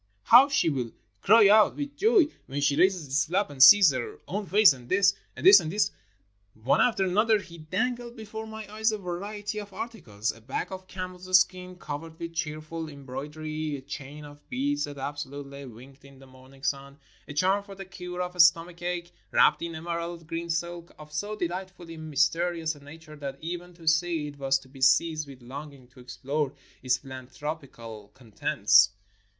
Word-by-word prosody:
"How 255 +4 +7
she 280 -9 +2
will 130 -7 -1 0.3
cry 220 0 +7
out 215 +1 +5
with 290 0 -5
joy 415 0 +4 0.2
when 140 +1 -4
she 145 0 +2
raises 185 -2 +2
this 140 +4 0
flap 185 0 0
and 135 -2 -5
sees 185 +5 +9
her 130 -3 -5
own 205 +1 -4
face. 205 -5 +6
And 125 -2 -14
this! 195 0 +4 0.2
and - - -7
this! 200 +2 +10
and 160 -3 -4
this!" 210 +3 +1 0.6
One 110 +5 +2
after 220 -6 +2
another 215 +4 +3
he 170 -4 -11
dangled 235 +9 -3
before 220 -1 -8
my 220 -1 -8
eyes 220 +1 +1
a 215 - -2
variety 205 +3 -5
of 205 -1 -9
ar 195 +4 -4
ticles; 110 - -5
a 115 - -17
bag 130 - -4
of 185 0 -8
camel's 185 0 +1
skin, 185 0 -2
covered 160 0 -7
with 170 0 -6
cheerful 155 0 -4
em 140 -2 -12
broidery; 150 +3 -5
a 135 - -7
chain 140 +2 -8
of 145 0 -15
beads, 285 +3 -1
that 145 -1 -9
absolutely 140 0 -6
winked 130 +4 -14
in 140 -1 -16
the 135 - -15
morning 130 +1 -18
sun; 140 0 -3 0.3
a 145 - -7
charm 190 +5 +2
for 200 -1 -11
the 195 0 -8
cure 180 -1 -6
of 180 0 +2
stomach 170 +1 +3
ache, 175 0 -3 0.2
wrapped 150 - +4
in 170 -1 -4
emerald 170 +1 -5
green 165 +1 -5
silk, 170 +1 -4
of 150 0 -13
so 205 +7 -3
delightfully 180 -2 -5
mys 155 -2 +2
terious 165 -1 -2
a 145 - -16
nature 155 +1 -12
that 140 -2 -6
even 175 +2 -6
to 165 -2 -15
see 165 -1 +2
it 145 -1 -14
was 135 0 +2
to - - -15
be 135 0 -15
seized 155 +3 +3
with 130 -3 -13
longing 140 0 -9
to 125 0 -20
explore 135 +3 -3 0.3
its 125 -1 +1
philanthropical 130 -5 -8
contents. 110 -4 +3
165 Hz, 190 wpm, -27 LUFS, 140-185 Hz, 0.6 s, this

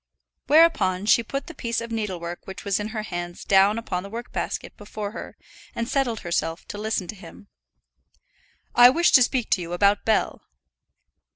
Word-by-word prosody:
Whereupon 205 - +4
she 220 - +5
put 275 +5 -5
the 340 - -9
piece 235 -6 -2
of 230 0 -7
needlework 180 -6 -4
which 190 +2 -9
was 200 -1 0
in 210 - -3
her 215 -1 -4
hands 175 -3 -6
down 195 +2 +4
upon 185 -6 -3
the 200 - -9
work 235 +3 -7
basket - - -4
before 205 0 -6
her, - - -9 0.4
and 230 - -2
settled 250 -5 -1
herself 165 -1 -3
to 205 - -6
listen 215 -3 -2
to - - -5
him. 200 +1 -14 1.2
"I 245 0 +8
wish 340 +7 +3
to 260 - +7
speak 250 -1 0
to 185 - +2
you 170 0 -6
about 200 +3 +2
Bell." 220 -1 0
210 Hz, 180 wpm, -24 LUFS, 190-235 Hz, 1.2 s, I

